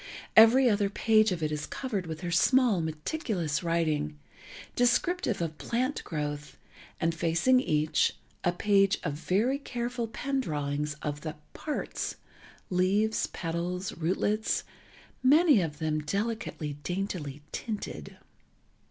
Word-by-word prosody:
Every 240 +4 +8
other 205 -3 +2
page 215 +1 +3
of 170 -3 -2
it 155 - 0
is 150 -1 -3
covered 210 -10 -3
with 160 -1 -6
her 175 - -3
small, 230 +2 +4
meticulous 160 - -2
writing, 160 - 0 0.6
descriptive 245 - +1
of 160 -2 -5
plant 255 +4 -1
growth, 150 -2 -4 0.4
and 165 +1 +1
facing 170 +10 +3
each, 155 - +1 0.3
a 175 - +3
page 195 +1 +3
of 150 - -1
very 210 - 0
careful 240 -3 -3
pen 275 +4 -2
drawings 150 - -2
of 145 0 -3
the 155 0 -5 0.2
"parts"—leaves, 210 -7 -2
petals, 175 +2 -3
rootlets, 195 +6 0 0.6
many 290 - +6
of 155 -3 -3
them 155 -1 -1
delicately, 195 -4 -3
daintily 175 -6 -4
tinted. 215 -3 -5
180 Hz, 115 wpm, -29 LUFS, 155-230 Hz, 0.6 s, Every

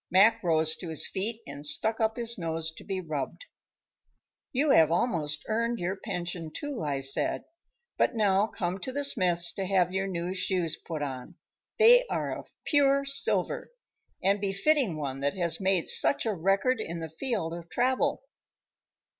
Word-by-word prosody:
Mac 220 +5 +5
rose 160 -2 +2
to 175 - -7
his 160 - +1
feet 220 +4 -3
and 140 +1 -9
stuck 220 +9 -1
up 220 0 0
his 235 -1 0
nose 165 -2 -3
to 160 - -13
be 195 -2 -3
rubbed. 155 - -5 1.1
"You 280 +3 +2
have 160 - +6
almost 160 -5 0
earned 230 +2 0
your 180 0 -2
pension, 175 -5 -5
too," 290 - -5
I 140 -2 -2
said. 135 - +2 0.6
"But - - +2
now 205 -1 +3
come 185 -3 -3
to 260 - -5
the 285 +2 -2
smith's 175 -10 +2
to 195 - -3
have 180 -2 +2
your 190 0 -1
new 180 -1 -3
shoes 180 -3 -1
put 160 -3 -6
on. 130 -3 -6 0.4
They - - +7
are - - -2
of - - -11
pure 280 -2 +3
silver, 275 0 +1 0.5
and 195 +2 +2
befitting 200 - +1
one 135 -3 -4
that 140 +1 -1
has 170 -1 0
made 190 -3 +1
such - - +4
a 220 - 0
record 195 +8 +1
in 170 -5 -4
the 165 - -5
field 165 - -3
of 170 0 -8
travel." 260 +3 0
190 Hz, 170 wpm, -28 LUFS, 165-230 Hz, 1.1 s, They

